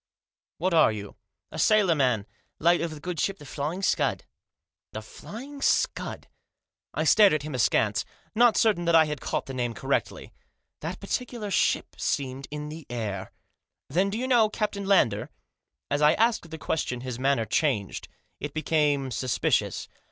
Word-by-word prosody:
"What 180 +2 0
are 160 -8 +6
you?" 105 -2 -7 0.2
' - - -59
A - - -6
sailor 210 -5 +4
man, 125 -9 +1 0.3
late 170 +2 +3
of 170 - -1
the 155 -1 -8
good 175 +1 -5
ship 195 0 0
Flying 150 +5 -4
Scud" - - +1 0.3
" - - -65
The - - -5
Flying 280 - -10
Scud - - 0 0.3
?" - - -65
I - - 0
stared 210 -5 +6
at 155 -2 0
him 155 -1 -6
askance, 110 -4 +2 0.3
not 235 0 +5
certain 210 -7 +2
that 170 0 +4
I 160 -1 +7
had 150 -3 -4
caught - - -2
the 135 - -7
name 120 -2 -2
correctly. - - -2 0.5
That 170 +4 -5
particular 220 0 -4
ship - - +1
seemed 135 -1 -2
in 150 0 -5
the 155 0 -9
air. 105 -5 -4 0.3
" - - -62
Then 185 +6 +2
do 205 - -3
you 255 +2 -2
know 235 -4 +4
Captain 210 -2 -3
Lander? 115 - +3 0.3
" - - -48
As 145 +1 +1
I 150 +1 +6
asked 225 -5 +1
the 160 - -7
question 125 -6 -2
his 125 -1 -5
manner 135 -3 +2
changed. 115 - -1 0.3
It 145 +1 -6
became 150 -4 +1
suspicious. 125 -1 0
155 Hz, 175 wpm, -27 LUFS, 130-200 Hz, 0.5 s, I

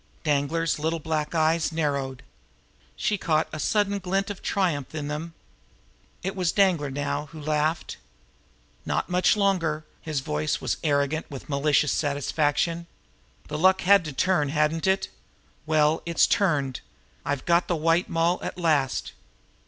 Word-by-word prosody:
Danglar's 150 +2 0
little 160 +2 0
black 155 0 -2
eyes 160 0 +2
narrowed. 140 -4 -2 0.7
She 210 -2 -1
caught 160 -3 +1
a 155 - -4
sudden 205 +3 +1
glint 195 +2 -1
of 200 - -8
triumph 160 -8 -1
in 145 -2 -3
them. 160 +3 -5 0.9
It 190 +2 -3
was 180 -3 +1
Danglar 180 -8 +2
now 145 +2 -3
who 155 +2 -11
laughed. 155 +2 -1 0.9
"Not - - -2
much 180 +3 +3
longer!" 165 -6 +1 0.2
His 155 -4 -2
voice 150 +1 -1
was - - -2
arrogant 145 +1 0
with 140 0 -9
malicious 145 +1 +2
satisfaction. 150 +3 0 0.6
"The 150 0 -4
luck 185 +2 +4
had 200 0 +5
to 150 - -4
turn, 150 0 +1
hadn't 150 +4 +1
it? 190 0 +1 0.6
Well, 155 0 +3
it's 170 -1 +3
turned! 145 -10 +1 0.4
I've 145 -2 -2
got 170 +1 +3
the 175 - +1
White 165 +3 +1
Moll 165 +2 +1
at - - -5
last!" 150 -7 +1
155 Hz, 145 wpm, -26 LUFS, 150-175 Hz, 0.9 s, had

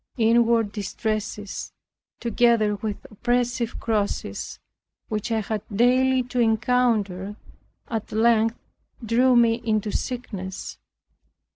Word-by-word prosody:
Inward 230 -1 +3
distresses, 210 0 -4 0.5
together 235 -2 +3
with 205 0 -5
oppressive 240 +1 -1
crosses, 215 -3 -2 0.5
which 215 +1 -3
I 220 -1 +1
had 215 0 -3
daily 255 +4 +3
to 250 0 -4
encounter, 220 -4 +1 0.5
at 225 -3 -4
length 225 +1 +3 0.5
threw 250 +3 +4
me 230 -1 +4
into 215 -2 0
sickness. 200 -8 -5
225 Hz, 95 wpm, -24 LUFS, 210-240 Hz, 0.5 s, threw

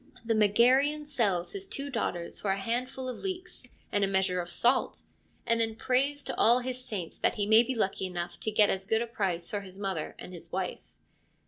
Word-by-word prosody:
The 225 - +2
Megarian 255 +8 +4
sells 210 -12 0
his 395 -1 -4
two 280 +1 -4
daughters 175 -8 -3
for 205 - -2
a 195 - +2
handful 250 +5 -3
of 250 - -5
leeks 370 -1 -5 0.3
and 205 - +1
a - - +3
measure 190 -2 +1
of 175 - -8
salt, 245 +7 +1 0.4
and 230 -1 +2
then 225 -1 0
prays 275 +5 +1
to - - -3
all 235 +2 +6
his 255 0 -4
saints 190 -9 -5
that - - +2
he 205 -3 0
may 220 +2 +7
be 250 +2 -2
lucky 190 -3 0
enough 175 -1 -5
to - - -1
get 210 -1 +4
as 190 0 -3
good 220 +2 +2
a - - -3
price 190 -7 -2
for 205 - -2
his 190 -1 -10
mother 190 -6 -3
and 180 - -9
his 165 -1 -11
wife. 185 0 -4
220 Hz, 215 wpm, -29 LUFS, 190-255 Hz, 0.4 s, may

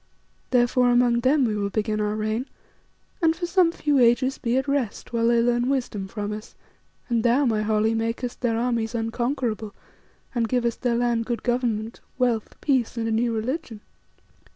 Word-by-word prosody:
Therefore 250 0 +3
among 240 -1 +3
them 260 +3 +3
we 215 -2 0
will 200 -1 -1
begin 215 +1 -1
our 210 0 -1
reign 215 +4 -2 0.7
and 325 -1 +3
for 345 +1 -3
some 350 -1 +3
few 295 -4 +1
ages 250 +2 +3
be 240 +1 0
at 265 - -1
rest 275 -5 -2
while 230 0 +2
they 235 0 +4
learn 240 +1 +1
wisdom 240 -8 -2
from 210 +1 -4
us, 215 +1 -9 0.5
and 235 -2 +1
thou, 245 +5 +3
my 220 -3 +1
Holly, 215 +1 +1
makest 230 +2 -3
their 230 -3 +1
armies 235 -1 -1
unconquerable 225 -2 -2 0.6
and 230 -3 0
givest 240 -2 0
their 245 -2 +1
land 235 -1 0
good 235 -3 -3
government, 235 -2 -1 0.2
wealth, 240 -4 -1
peace, 255 -5 0
and 225 -1 -1
a - - -1
new 230 +2 +1
religion." 230 0 -3
235 Hz, 175 wpm, -24 LUFS, 225-250 Hz, 0.7 s, they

